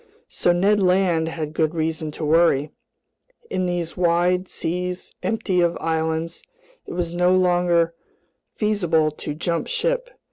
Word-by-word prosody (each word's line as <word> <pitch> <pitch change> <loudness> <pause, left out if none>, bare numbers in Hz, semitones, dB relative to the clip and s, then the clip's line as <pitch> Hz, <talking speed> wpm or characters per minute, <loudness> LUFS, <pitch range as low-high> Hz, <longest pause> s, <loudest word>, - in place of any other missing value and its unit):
So 175 - +1
Ned 200 +4 +3
Land 180 -3 +2
had 155 -2 -5
good 160 0 0
reason 160 -1 -2
to 155 - -4
worry. 155 -2 +3 0.8
In 185 -1 0
these 175 -2 -2
wide 180 +1 +2
seas 180 +2 -4
empty 190 -2 0
of 170 0 +1
islands, 160 +1 -2 0.5
it - - -6
was 170 -1 -2
no 180 +1 +3
longer 175 -2 +2 0.6
feasible 175 -8 +1
to 150 0 -6
jump 170 +1 -2
ship. - - -1
175 Hz, 135 wpm, -22 LUFS, 160-180 Hz, 0.8 s, Ned